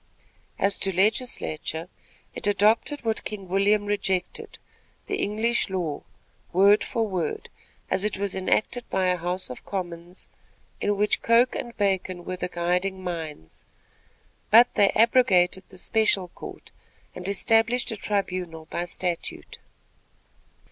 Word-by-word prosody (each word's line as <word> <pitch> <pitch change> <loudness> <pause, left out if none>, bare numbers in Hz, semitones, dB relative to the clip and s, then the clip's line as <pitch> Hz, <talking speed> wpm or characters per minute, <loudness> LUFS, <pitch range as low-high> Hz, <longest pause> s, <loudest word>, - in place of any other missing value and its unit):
As 195 0 0
to 195 - 0
legislature, 185 - 0 0.5
it - - -3
adopted 215 +7 +2
what 225 -1 -1
King 200 -3 -6
William 200 +3 +2
rejected 195 -3 -2 0.5
the - - -2
English 220 +2 0
law, 170 -6 -2 0.5
word 200 +4 +5
for 225 -1 -1
word, 180 -6 -3 0.4
as 195 - +1
it 210 -2 -1
was 200 -1 -1
enacted 215 +5 0
by 190 -1 +1
a 180 - +2
house 180 -2 -3
of 125 - -9
commons, 175 -2 -6 0.5
in 205 0 0
which 210 +1 +2
Coke 235 +2 +4
and 235 - -6
Bacon 190 -3 -1
were 185 - -3
the 180 - -3
guiding 180 +2 -1
minds; 160 - -6 0.9
but 235 +3 +7
they 200 -1 +4
abrogated 200 -6 +3
the 185 - -13
special 200 -3 +1
court, - - -11 0.4
and 180 0 -7
established 225 +4 +2
a - - -3
tribunal 185 -6 -3
by 175 - -2
statute. 175 -1 -4
195 Hz, 130 wpm, -25 LUFS, 180-210 Hz, 0.9 s, but